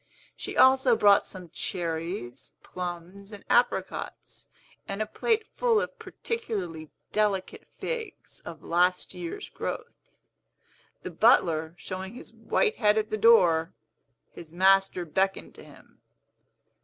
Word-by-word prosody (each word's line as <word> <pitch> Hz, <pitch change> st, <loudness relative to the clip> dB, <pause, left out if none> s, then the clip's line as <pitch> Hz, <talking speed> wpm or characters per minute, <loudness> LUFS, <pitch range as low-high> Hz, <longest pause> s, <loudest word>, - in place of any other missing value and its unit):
She -, -, -7 dB
also 260 Hz, -2 st, +6 dB
brought 205 Hz, -2 st, +5 dB
some 180 Hz, -4 st, -10 dB
cherries, 165 Hz, -8 st, -5 dB
plums, 180 Hz, +3 st, -7 dB
and 205 Hz, -1 st, -11 dB
apricots, 240 Hz, +1 st, -1 dB, 0.4 s
and 195 Hz, +1 st, -4 dB
a 215 Hz, -, 0 dB
plate 445 Hz, -, 0 dB
full 470 Hz, -3 st, +2 dB
of -, -, -5 dB
particularly 185 Hz, -, -5 dB, 0.2 s
delicate 205 Hz, -3 st, -1 dB
figs, 465 Hz, -2 st, -6 dB
of 160 Hz, -2 st, -10 dB
last 180 Hz, +2 st, +1 dB
year's 175 Hz, -2 st, -6 dB
growth. -, -, -7 dB, 0.9 s
The -, -, -6 dB
butler 160 Hz, 0 st, +3 dB
showing 190 Hz, +4 st, -7 dB
his -, -, -11 dB
white 450 Hz, -2 st, 0 dB
head 210 Hz, -1 st, +3 dB
at 215 Hz, 0 st, -1 dB
the -, -, +1 dB
door, 180 Hz, -7 st, +4 dB, 0.6 s
his 165 Hz, -2 st, -12 dB
master 190 Hz, 0 st, +3 dB
beckoned 190 Hz, +4 st, -1 dB
to -, -, -14 dB
him. -, -, -18 dB
190 Hz, 120 wpm, -27 LUFS, 170-220 Hz, 0.9 s, also